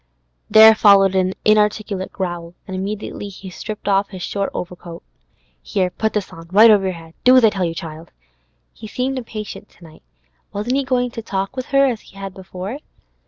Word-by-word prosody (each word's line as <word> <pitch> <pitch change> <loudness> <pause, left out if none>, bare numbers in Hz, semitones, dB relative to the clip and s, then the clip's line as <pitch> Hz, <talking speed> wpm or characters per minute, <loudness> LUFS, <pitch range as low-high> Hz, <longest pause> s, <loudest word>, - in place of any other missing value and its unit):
There 220 +1 +9
followed 200 -3 +5
an 185 0 +1
inarticulate 210 -2 +1
growl, 175 -2 -5
and 190 - -6
immediately 200 +1 -5
he 190 -1 -10
stripped 210 +3 -7
off 200 0 +2
his 185 -3 -8
short 200 -1 -2
overcoat. 175 -1 -8 0.6
'Here, 180 - -1
put 220 +3 -2
this 210 -3 -3
on, 165 0 -11
right 215 +4 +8
over 200 -2 +4
your 190 - -1
head. 165 -1 -12
Do 255 0 +7
as 250 - +6
I 220 - +5
tell 190 -3 -1
you, 165 -1 -3
child!' 160 0 -8 0.6
He 220 - -10
seemed 260 +4 -2
impatient 215 -3 -8
to - - -21
night. 160 -2 -15 0.5
Wasn't 215 +6 -1
he 275 - +1
going 250 -1 0
to 230 - -6
talk 195 +1 -3
with 255 -1 -5
her 275 0 +4
as 240 -5 -2 0.3
before? 190 +6 -7
200 Hz, 185 wpm, -20 LUFS, 185-220 Hz, 0.6 s, There